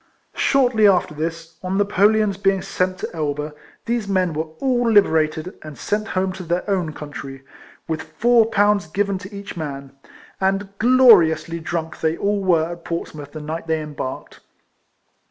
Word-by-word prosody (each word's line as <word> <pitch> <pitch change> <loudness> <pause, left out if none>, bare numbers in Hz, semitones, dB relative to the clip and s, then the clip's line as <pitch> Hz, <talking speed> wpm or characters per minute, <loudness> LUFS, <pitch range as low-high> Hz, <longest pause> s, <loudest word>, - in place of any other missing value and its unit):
Shortly 245 -6 +3
after 180 -5 +2
this, 165 +1 -5
on 185 +1 -2
Napoleon's 205 +1 +3
being 195 -1 +1
sent 185 0 -1
to 180 - -6
Elba, 150 -1 -3 0.3
these 235 -3 -1
men 185 -4 +1
were 155 +1 -2
all 245 -3 +1
liberated 160 -5 +2
and 155 -2 -10
sent 215 +1 -2
home 185 -1 -1
to 190 - -8
their 175 +3 -2
own 185 -6 0
country, 135 -3 -8 0.4
with 160 -1 -2
four 225 +9 +3
pounds 205 -4 +2
given 195 +3 -1
to 190 +2 -10
each 200 0 -8
man; 140 -4 -6 0.5
and 195 +1 0
glori 235 -8 +7
ously 160 +2 -5
drunk 165 0 -4
they 160 +1 +1
all 200 0 0
were 170 -3 +2
at 170 -1 -9
Portsmouth 150 -4 -5
the 155 - -6
night 160 +2 -5
they 160 -1 +1
embarked. 150 -4 -6
180 Hz, 160 wpm, -21 LUFS, 160-205 Hz, 0.5 s, glori